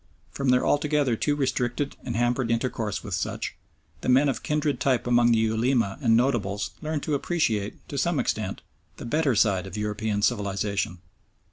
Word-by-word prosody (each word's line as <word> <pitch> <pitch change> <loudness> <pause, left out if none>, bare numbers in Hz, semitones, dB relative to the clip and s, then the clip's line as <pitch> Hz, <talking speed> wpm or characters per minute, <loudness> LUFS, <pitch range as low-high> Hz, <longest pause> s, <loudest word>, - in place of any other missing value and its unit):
From 135 +3 -1
their 125 0 +4
altogether 145 -4 +2
too 145 +6 0
restricted 135 0 -1
and 120 - -4
hampered 120 +1 +1
intercourse 115 -3 -1
with - - -6
such, - - -2 0.5
the - - -2
men 135 +3 +5
of 135 - -2
kindred 150 -3 0
type 130 -4 +1
among 120 -1 +4
the 115 - +4
Ulema 110 -1 +1
and 115 0 +4
notables 105 -6 0
learned 155 -2 -3
to 155 - -1
appreciate, 135 - -1
to - - -3
some - - +1
extent, - - -2 0.3
the - - -8
better 145 0 +1
side 100 -3 +2
of 95 - -7
European 105 0 -2
civilisation. 100 -2 0
120 Hz, 165 wpm, -26 LUFS, 105-140 Hz, 0.5 s, men